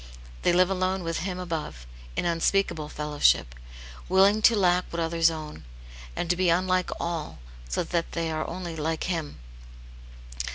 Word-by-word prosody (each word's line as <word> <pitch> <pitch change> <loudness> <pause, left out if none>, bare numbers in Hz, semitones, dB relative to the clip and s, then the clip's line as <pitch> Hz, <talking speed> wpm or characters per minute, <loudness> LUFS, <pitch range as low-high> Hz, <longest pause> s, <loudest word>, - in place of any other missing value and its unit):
They - - +3
live 180 +2 +4
alone 185 0 0
with 165 -1 -2
Him 180 0 -3
above, 165 - -5 0.3
in - - -1
unspeakable 170 -2 +1
fellowship; 150 - +2 0.6
willing 195 +3 +5
to 230 +1 +6
lack 180 -2 +3
what 170 - -4
others 165 0 +3
own, 155 -2 -7 0.5
and - - -2
to 175 - +2
be 180 0 +2
unlike 185 +1 +2
all, 170 -3 -3 0.3
so - - 0
that 170 -1 -2
they 165 -1 -1
are 155 0 -2
only 175 -3 -5
like 160 +1 -2
Him. 165 -5 -3
170 Hz, 155 wpm, -26 LUFS, 160-185 Hz, 0.6 s, to